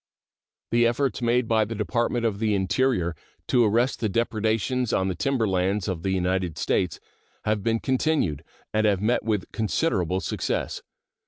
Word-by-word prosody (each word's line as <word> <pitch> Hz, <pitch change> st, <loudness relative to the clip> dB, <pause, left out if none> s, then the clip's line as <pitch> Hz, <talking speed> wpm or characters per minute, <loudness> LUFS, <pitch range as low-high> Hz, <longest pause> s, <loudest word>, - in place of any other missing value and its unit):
The 120 Hz, 0 st, +4 dB
efforts 120 Hz, 0 st, 0 dB
made 120 Hz, 0 st, +2 dB
by 110 Hz, -1 st, +3 dB
the 110 Hz, +2 st, -4 dB
Department 115 Hz, +4 st, 0 dB
of 105 Hz, -3 st, 0 dB
the 110 Hz, -2 st, +1 dB
Interior 95 Hz, -2 st, +1 dB, 0.3 s
to 125 Hz, -2 st, +4 dB
arrest 115 Hz, +5 st, +2 dB
the 110 Hz, -, 0 dB
depredations 115 Hz, +3 st, 0 dB
on 95 Hz, 0 st, +1 dB
the -, -, -1 dB
timber 125 Hz, +2 st, 0 dB
lands 95 Hz, +2 st, 0 dB
of 90 Hz, -4 st, -2 dB
the 95 Hz, -, -2 dB
United 90 Hz, -2 st, 0 dB
States 90 Hz, -4 st, 0 dB, 0.5 s
have 105 Hz, -1 st, +1 dB
been 115 Hz, +2 st, +1 dB
continued, 130 Hz, -, 0 dB, 0.3 s
and 110 Hz, 0 st, +3 dB
have 100 Hz, -3 st, +2 dB
met 110 Hz, +5 st, +1 dB
with 105 Hz, -4 st, -1 dB
considerable 100 Hz, -, 0 dB
success. -, -, -2 dB
110 Hz, 160 wpm, -25 LUFS, 95-120 Hz, 0.5 s, The